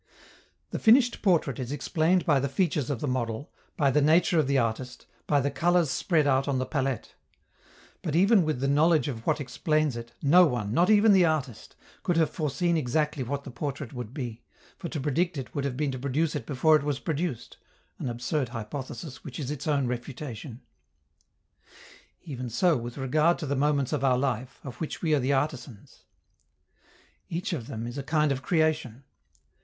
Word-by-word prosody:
The - - -3
finished 240 +2 +4
portrait 165 - +2
is 125 0 -4
explained 165 +4 +1
by 145 -4 +4
the 140 +1 -1
features 150 -2 0
of 135 -5 -2
the 150 - -1
model, 125 0 -3 0.3
by 140 -3 +3
the 150 - +3
nature 160 +3 +4
of 150 - +2
the 140 0 +2
artist, 125 +1 -2 0.2
by 145 - +3
the 140 +1 0
colors 175 -3 +2
spread 160 -5 +1
out 135 -1 +2
on 140 -2 0
the 130 - -1
palette; 135 -4 -2 0.9
but, 155 - -3
even 195 +3 +5
with 155 -5 -2
the 140 - +1
knowledge 155 +3 +3
of 115 -5 -6
what - - +2
explains 145 +2 0
it, 115 0 -7
no 170 +6 +7
one, 110 -6 -2
not 175 - +3
even 215 0 +6
the 185 -2 +5
artist, 150 -8 -2 0.3
could 175 - 0
have 160 -2 +2
foreseen 165 +2 0
exactly 150 +1 0
what 140 +3 -3
the 135 - -8
portrait 140 0 -5
would 120 -3 -6
be, 125 -5 -6 0.3
for 170 - -6
to 155 - -4
predict 155 +4 0
it 130 -3 -6
would 140 -1 -2
have 130 -3 -3
been 145 -1 0
to 130 - -5
produce 145 +4 -1
it 130 -6 -5
before 150 +3 +4
it 155 - +3
was 145 -1 -1
produced 155 -2 -4 0.4
an 130 - -3
absurd 125 +3 -2
hypothesis 130 +5 -7
which 130 -1 -8
is 140 -2 -3
its 150 -1 -5
own 140 -3 +2
refutation. 125 0 -6 1.6
Even 130 -6 -6
so 160 +9 +2
with 120 +1 -5
regard 150 +5 +2
to 160 - -5
the 140 0 -1
moments 140 0 +1
of 140 -3 -1
our 130 -2 +3
life, 130 -1 -2
of 125 - -8
which 160 - -5
we 160 -2 +2
are 150 - +4
the 130 +2 0
artisans. 135 -5 -3 1.2
Each 175 +3 -3
of 125 -9 -4
them 110 +1 -5
is 120 +4 -5
a - - -2
kind 150 0 +1
of 130 -1 -2
creation. 155 -6 0
140 Hz, 190 wpm, -27 LUFS, 130-155 Hz, 1.6 s, no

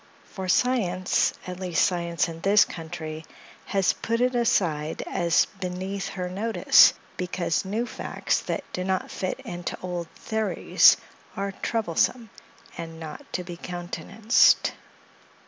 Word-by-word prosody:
For 190 -1 -7
science, 185 -6 +2
at 180 0 -6
least 180 -3 +2
science 170 0 0
in 165 0 -8
this 200 +2 +5
country, 160 -1 -7 0.4
has 195 -1 +2
put 230 +1 -2
it 250 +1 +2
aside 165 -10 0
as 170 0 +2
beneath 190 +2 -4
her 180 -2 -4
notice, 205 +5 +5 0.2
because 180 -1 -1
new 215 +5 -1
facts - - -2
that - - -3
do 180 - -2
not 190 0 -1
fit 185 - -3
into 175 0 -5
old 175 -2 -4
theories 220 -1 +3 0.4
are 200 0 -2
troublesome, 225 +3 -1 0.4
and 165 -1 -7
not 155 -2 -9
to 180 - -2
be 175 -1 -8
countenanced. 180 +7 +2
185 Hz, 130 wpm, -26 LUFS, 170-200 Hz, 0.4 s, this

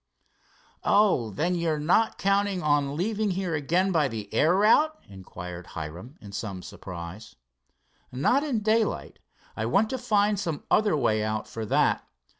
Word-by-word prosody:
"Oh, 200 - +3
then 160 - -1
you're 170 -3 0
not 175 +9 +2
counting 200 -1 +1
an 145 -1 +1
leaving 210 +3 0
here 185 -2 -2
again 170 +6 +1
by 155 -5 +2
the 110 -4 -7
air 155 +10 +4
route?" 295 +10 +4
inquired 90 -2 -9
Hiram 85 - -7
in 100 - -11
some 100 -2 -5
surprise. 90 +4 -9 0.8
"Not 195 - +2
in 260 -8 -1
daylight. 220 0 0 0.4
I 110 - -2
want 200 - +2
to 260 - -2
find 210 -4 +2
some 165 -7 -3
other 210 -7 +3
way 110 -6 +1
out 110 0 -2
for 110 -1 -6
that. - - +2
160 Hz, 150 wpm, -26 LUFS, -, 0.8 s, air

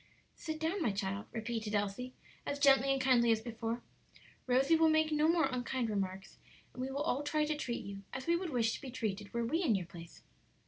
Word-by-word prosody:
"Sit 315 -1 -5
down, 330 +5 -1
my 235 - +2
child," 200 +1 -3
repeated 225 -1 -3
Elsie, 205 +5 -2 0.3
as 285 - -3
gently 275 -1 +5
and 270 - +1
kindly 250 -3 +4
as 225 - +3
before; 230 +1 -4 0.6
"Rosie 265 +6 +4
will 320 0 +5
make 315 0 +3
no 305 0 +3
more 330 -1 +4
unkind 250 -2 -1
remarks; 195 -2 -4 0.3
and 255 - -6
we 260 - -2
will 280 +2 -2
all 285 -3 0
try 300 +1 +1
to 305 0 -1
treat 245 -5 -4
you 195 0 -7
as 265 - -5
we 335 - +3
would 350 0 -2
wish 230 -5 +1
to - - -6
be 270 - -7
treated 210 -5 -3
were 235 0 -1
we 320 +9 0
in 265 - +3
your 185 -3 -2
place." 170 0 -12
250 Hz, 220 wpm, -34 LUFS, 220-295 Hz, 0.6 s, gently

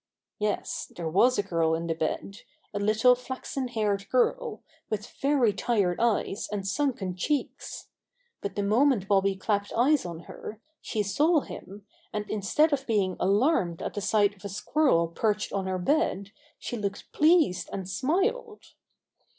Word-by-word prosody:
Yes, 210 0 -2
there 170 -2 -4
was 240 +10 +4
a 205 - +1
girl 165 -4 +1
in 165 +1 -3
the 165 - 0
bed, 165 +5 -3 0.4
a 205 - -2
little 215 +4 +4
flaxen 255 +1 -4
haired 210 -4 -1
girl, 440 - 0 0.3
with 210 -1 -2 0.2
very 275 -6 +3
tired 200 -5 0
eyes 220 -3 0
and 200 -2 -3
sunken 205 -7 -1
cheeks. 285 +10 -3 0.5
But 200 - -4
the 205 - -1
moment 225 0 +3
Bobby 195 -1 +3
clapped 200 +1 -1
eyes 275 +5 +3
on 170 -2 -6
her, 210 +5 -9 0.2
she 215 -2 -1
saw 295 - +3
him, 200 -4 -10 0.3
and 210 0 -3
instead 215 +10 +2
of 275 -1 -1
being 200 -5 +1
alarmed 195 - +2
at - - -4
the 205 - -3
sight 205 0 +2
of 190 - -21
a 200 - -5
squirrel 205 - +2
perched 210 +5 -1
on 195 -1 -1
her 185 0 -1
bed 200 - 0 0.3
she 240 - -5
looked 200 -2 -4
pleased 305 - +3
and 190 -2 -5
smiled. 390 - -1
210 Hz, 160 wpm, -27 LUFS, 195-260 Hz, 0.5 s, was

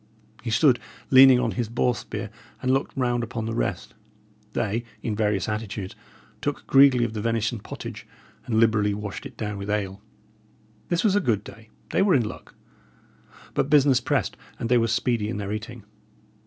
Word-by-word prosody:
He 120 - -4
stood 125 +1 +4 0.3
leaning 130 -1 +8
on 120 -3 0
his 110 +3 -3
boar 120 +1 +1
spear, 110 -2 -6 0.3
and 130 0 +1
looked 135 0 -1
round 120 -2 +1
upon 115 -1 -4
the 115 - -3
rest. 100 -5 -2 0.6
They, 115 +1 -1 0.2
in 110 - -2
various 105 -2 0
attitudes, 105 -3 -4 0.5
took - - -3
greedily 135 -3 +6
of 115 - -4
the 105 - -3
venison 115 0 -1
pottage, - - -8 0.4
and 110 -2 +1
liberally 110 -3 +3
washed 105 -4 -6
it - - -19
down 105 -2 -4
with 100 +1 -6
ale. 100 -2 -2 0.9
This 175 0 +1
was 205 -3 +3
a - - +5
good 110 - 0
day; 110 0 -13 0.2
they - - +2
were 195 -4 +4
in 120 -5 +2
luck; - - -10 1.0
but 135 - 0
business 140 -3 +5
pressed, 135 -4 0 0.2
and 115 - -3
they 125 - +5
were 115 - +2
speedy 115 -1 0
in 115 - -3
their 100 0 -3
eating. 115 +1 -6
115 Hz, 180 wpm, -25 LUFS, 105-125 Hz, 1.0 s, leaning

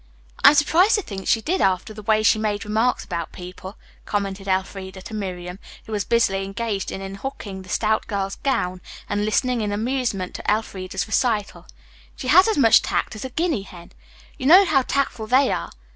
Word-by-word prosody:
"I - - +9
am 300 - +3
surprised 345 +8 +4
to 415 - -1
think 195 -7 -7
she 225 - +3
did 360 +10 -1
after 190 +3 +1
the 215 - -9
way 215 +1 +2
she 215 - +4
made 210 -1 -2
remarks 220 +4 0
about 170 -2 -4
people," 185 +2 -10 0.3
commented 200 -1 -3
Elfreda 190 0 -3
to 220 - -9
Miriam, 180 -3 -5 0.3
who - - -11
was 210 -2 -1
busily 200 -5 +1
engaged 200 +1 -3
in 195 - -6
unhooking 195 -1 -6
the 185 - -14
stout 220 +2 0
girl's 195 -2 -3
gown 185 -9 -1 0.3
and 205 0 -1
listening 245 +2 +1
in 210 -1 -2
amusement 220 -4 -2
to - - -2
Elfreda's 190 -3 -2
recital. 220 -1 -1 0.5
"She 255 - -5
has 370 +7 +7
as 440 - +1
much 230 -5 +6
tact - - -2
as 215 - -7
a - - -4
guinea 315 - -1
hen. 180 -3 -13 0.5
You 260 - -1
know 370 +6 +8
how 275 -6 +3
tactful 255 -4 -2
they 260 +3 +4
are?" - - -3
210 Hz, 190 wpm, -22 LUFS, 195-250 Hz, 0.5 s, I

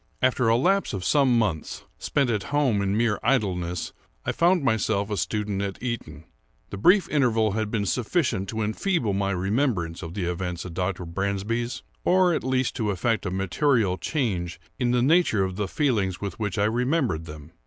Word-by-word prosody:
After 125 -2 +2
a 115 - +5
lapse 195 +9 +2
of 95 -2 -4
some 135 -3 +4
months, 95 -9 -1 0.2
spent 140 -4 +1
at 105 -4 -1
home 140 -8 +2
in 100 +1 0
mere 115 -2 +1
idleness, 90 -8 0 0.3
I - - +1
found 175 -1 +3
myself 110 -4 +1
a - - 0
student 105 -2 -1
at 100 -1 -3
Eton. 115 -11 -5 0.5
The 100 - -5
brief 180 - +5
interval 115 -7 +2
had 110 +1 -2
been 105 -2 -1
sufficient 120 - 0
to 110 -1 -2
enfeeble 110 - 0
my 100 0 0
remembrance 95 - -1
of 85 0 -7
the 100 -4 -2
events 90 0 -3
at 90 - -7
Dr. 90 0 -2
Bransby's, 100 +7 -2 0.2
or 185 -1 +4
at - - -1
least 130 -1 0
to 110 -4 0
effect 100 +1 0
a - - -1
material 95 - +1
change 95 - -2 0.2
in 125 -2 +1
the 120 0 +2
nature 150 - +3
of 95 -1 -3
the 105 0 -2
feelings 105 - 0
with 100 -1 -5
which 105 -3 -2
I 100 - +3
remembered 120 - 0
them. 75 0 -10
105 Hz, 185 wpm, -25 LUFS, 95-125 Hz, 0.5 s, a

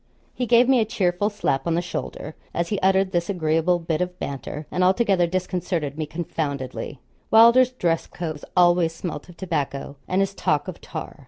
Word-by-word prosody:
He 250 - -2
gave 240 +1 +5
me 260 -2 +5
a 220 - +2
cheerful 195 -1 0
slap 190 -9 -1
on 165 - +1
the 170 - +1
shoulder 155 -3 -5 0.2
as 170 0 -1
he 205 - -1
uttered 190 0 +3
this 175 0 -1
agreeable 165 -1 +1
bit 165 -1 -2
of 180 0 -3
banter, 140 +1 -5
and 180 - +1
altogether 190 -2 +3
disconcerted 175 -4 -2
me 155 -1 -3
confoundedly. 145 -5 -4 0.3
Wylder's 235 +3 +7
dress 170 -9 0
coats 155 -4 -6
always 175 -2 +4
smelt 165 -2 -6
of 175 - -14
tobacco, 145 -5 -3
and 185 - +1
his 195 0 0
talk 150 -4 0
of 185 - -7
tar. 160 -1 -7
175 Hz, 180 wpm, -23 LUFS, 160-190 Hz, 0.3 s, Wylder's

